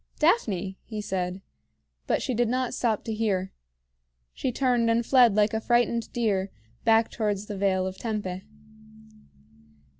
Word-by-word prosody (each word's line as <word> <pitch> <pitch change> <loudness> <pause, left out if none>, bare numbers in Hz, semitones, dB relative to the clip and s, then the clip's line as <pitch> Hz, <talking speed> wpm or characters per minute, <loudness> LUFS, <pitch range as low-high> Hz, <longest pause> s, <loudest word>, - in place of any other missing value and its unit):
"Daphne!" 205 - +1
he 215 -2 -6
said; 185 -2 -3 0.6
but - - +1
she 260 - -1
did 240 0 +1
not 255 0 -1
stop 230 -4 0
to 225 - -3
hear. 195 -4 -1 0.8
She 260 - -2
turned 245 -2 +1
and 230 +1 +2
fled 245 -5 +5
like 210 0 +3
a 220 - -1
frightened 240 -1 +1
deer, 200 -5 0 0.3
back 225 0 +4
towards 210 -2 -2
the 210 - -6
Vale 190 -1 +1
of 190 0 -5
Tempe. 205 -5 -3
220 Hz, 145 wpm, -26 LUFS, 195-240 Hz, 0.8 s, fled